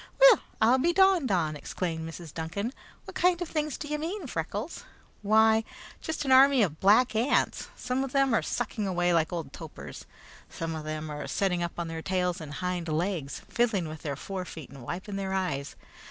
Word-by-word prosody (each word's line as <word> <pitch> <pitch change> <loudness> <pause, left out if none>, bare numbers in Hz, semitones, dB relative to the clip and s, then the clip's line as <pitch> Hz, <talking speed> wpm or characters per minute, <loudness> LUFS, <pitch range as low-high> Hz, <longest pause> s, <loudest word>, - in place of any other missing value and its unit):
"Weel, - - +9 0.2
I 235 +4 +5
be 335 +6 +2
drawed 380 -7 +4
on!" 165 -6 +1
exclaimed 160 +2 -4
Mrs. 165 -2 -9
Duncan. 190 +9 -3 0.3
"What - - -9
kind 360 -1 +3
of 355 - -3
things 305 -2 -2
do 295 - -6
ye 300 0 -1
mean, 340 +4 -4
Freckles?" 205 - -4 0.4
"Why, 220 +1 +4 0.4
just 315 -2 -3
an 265 - +1
army 265 -1 +7
of 160 -5 -2
black 215 +4 +5
ants. 235 +6 +1
Some 255 +2 -1
of 270 - -4
them 275 -2 +3
are 225 - +3
sucking 220 -3 -2
away 175 -1 +1
like 160 -2 +2
old 165 -6 -4
topers. 75 - -9 0.4
Some 165 0 -4
of 155 -1 -5
them 155 0 -4
are 150 0 -5
setting 180 -3 0
up 170 0 -2
on 170 -1 -2
their 165 0 -5
tails 180 -1 -1
and 150 -2 -7
hind 180 -1 -2
legs, 160 -2 -2
fiddling 220 -8 +1
with 155 0 -8
their 145 -2 -3
fore 185 +6 -5
feet 160 -6 -9
and 135 -1 -11
wiping 185 - -5
their 190 -1 -2
eyes. 145 -7 -2
190 Hz, 195 wpm, -28 LUFS, 160-250 Hz, 0.4 s, Weel